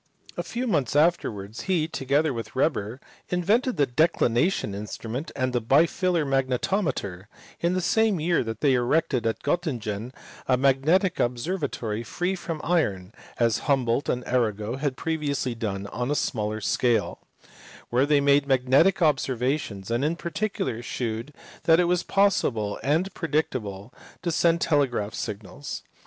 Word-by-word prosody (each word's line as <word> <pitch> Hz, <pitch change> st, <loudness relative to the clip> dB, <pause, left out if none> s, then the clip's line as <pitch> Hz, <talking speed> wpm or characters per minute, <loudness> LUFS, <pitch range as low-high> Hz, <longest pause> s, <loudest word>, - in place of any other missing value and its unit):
A -, -, -2 dB
few 245 Hz, +2 st, -4 dB
months 150 Hz, -, 0 dB
afterwards 115 Hz, -, +1 dB
he, 165 Hz, -4 st, +2 dB
together 140 Hz, 0 st, 0 dB
with 115 Hz, +1 st, -6 dB
Weber, 125 Hz, -4 st, 0 dB, 0.3 s
invented 210 Hz, +8 st, +1 dB
the 145 Hz, -, +4 dB
declination 145 Hz, -, +1 dB
instrument 110 Hz, +7 st, -5 dB
and 130 Hz, -1 st, -1 dB
the 120 Hz, -, +1 dB
bitilar 165 Hz, -, +2 dB
magnetometer; 130 Hz, -, -1 dB, 0.3 s
and 170 Hz, -, +2 dB
in -, -, 0 dB
the 185 Hz, -, 0 dB
same 220 Hz, 0 st, +2 dB
year 170 Hz, 0 st, +1 dB
they 115 Hz, +5 st, +1 dB
erected 125 Hz, -1 st, +1 dB
at 110 Hz, -, -2 dB
Gottingen 120 Hz, -, -2 dB, 0.4 s
a 130 Hz, -, +3 dB
magnetic 140 Hz, +8 st, +3 dB
observa 140 Hz, +7 st, -1 dB
tory 110 Hz, 0 st, -4 dB
free 175 Hz, +9 st, -2 dB
from 165 Hz, -4 st, -5 dB
iron 105 Hz, -, 0 dB, 0.2 s
(as 115 Hz, -2 st, +2 dB
Humboldt 130 Hz, -1 st, +1 dB
and 125 Hz, 0 st, -1 dB
Arago 115 Hz, -1 st, 0 dB
had 140 Hz, -2 st, -2 dB
previously 145 Hz, -6 st, -1 dB
done 100 Hz, -4 st, -4 dB
on 125 Hz, +5 st, -3 dB
a 145 Hz, -, +1 dB
smaller 110 Hz, -5 st, -1 dB
scale) 120 Hz, +2 st, +1 dB, 0.7 s
where 130 Hz, +4 st, +3 dB
they 145 Hz, -1 st, +4 dB
made 140 Hz, 0 st, +4 dB
magnetic 135 Hz, +8 st, +3 dB
observa 135 Hz, -3 st, +2 dB
tions, 100 Hz, -5 st, -7 dB
and 120 Hz, +3 st, +1 dB
in 155 Hz, +3 st, +1 dB
particular 175 Hz, -, -3 dB
shewed 115 Hz, +2 st, -4 dB, 0.3 s
that 165 Hz, 0 st, +6 dB
it -, -, +5 dB
was 175 Hz, 0 st, +2 dB
possible 130 Hz, -, +1 dB
and 160 Hz, +8 st, 0 dB
practicable 130 Hz, -, -2 dB, 0.3 s
to 170 Hz, -, 0 dB
send 170 Hz, +1 st, +2 dB
telegraphic 125 Hz, -, +1 dB
signals. 105 Hz, +7 st, -6 dB
135 Hz, 145 wpm, -25 LUFS, 115-165 Hz, 0.7 s, that